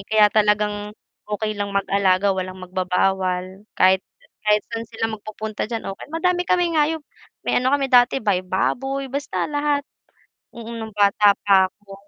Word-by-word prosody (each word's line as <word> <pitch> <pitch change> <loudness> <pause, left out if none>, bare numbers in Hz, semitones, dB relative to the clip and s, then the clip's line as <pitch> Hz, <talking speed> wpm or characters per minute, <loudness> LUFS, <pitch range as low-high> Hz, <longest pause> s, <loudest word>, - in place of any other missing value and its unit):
Kaya 215 -1 +5
talagang 210 -1 +1 0.3
okey 215 +1 -2
lang 200 0 -3
mag-alaga 195 0 +2
walang 185 0 -5
magbabawal. 185 +1 -1
Kahit 185 0 +5 0.4
kahit 210 0 +4
saan 230 0 -4
sila 225 0 -2
magpupunta 215 0 -5
diyan, 225 0 -4
ok. 195 - -7
Madami 355 +2 +1
kami 355 -2 +1
hayop, 315 +1 +2 0.4
may - - +1
ano 255 +2 +1
kami 275 -2 0
dati 250 +1 +4
bay 195 -4 0
baboy, 270 +9 -1
basta 280 +2 -3
lahat. 290 -1 0 0.7
Mm, 230 0 -8
no'ng 220 -1 -7
bata 205 0 +5
pa 190 -2 +5
ako. 205 -1 -16
210 Hz, 150 wpm, -22 LUFS, 195-255 Hz, 0.7 s, Kaya